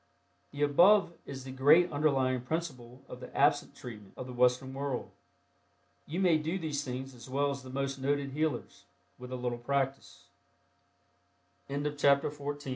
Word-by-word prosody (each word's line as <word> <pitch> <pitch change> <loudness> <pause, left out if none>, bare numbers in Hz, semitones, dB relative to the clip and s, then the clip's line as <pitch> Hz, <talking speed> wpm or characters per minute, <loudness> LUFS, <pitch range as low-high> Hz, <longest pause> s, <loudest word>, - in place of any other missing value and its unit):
The 145 +1 -2
above 175 +6 +5
is 135 -2 -7
the 130 - -7
great 145 +7 +5
underlying 135 -4 +1
principle 130 -4 -5
of - - -9
the - - -9
"absent - - +3
treatment" 105 -5 -10
of - - -5
the 125 - -8
Western 125 +2 +2
world. 135 -2 -3 1.0
You 165 +5 -3
may 175 -5 +4
do 160 +5 -2
these 150 -5 -2
things 130 0 -5
as 120 0 -12
well 140 +2 +1
as 140 0 -5
the 130 - -11
most 135 +1 -3
noted 140 +1 0
healers, 150 -3 -3 0.3
with 125 0 -9
a - - -2
little 125 -1 -3
practice. 135 +2 -2 1.4
CHAPTER 145 0 +2
XV. 145 0 -6
140 Hz, 155 wpm, -31 LUFS, 130-145 Hz, 1.4 s, above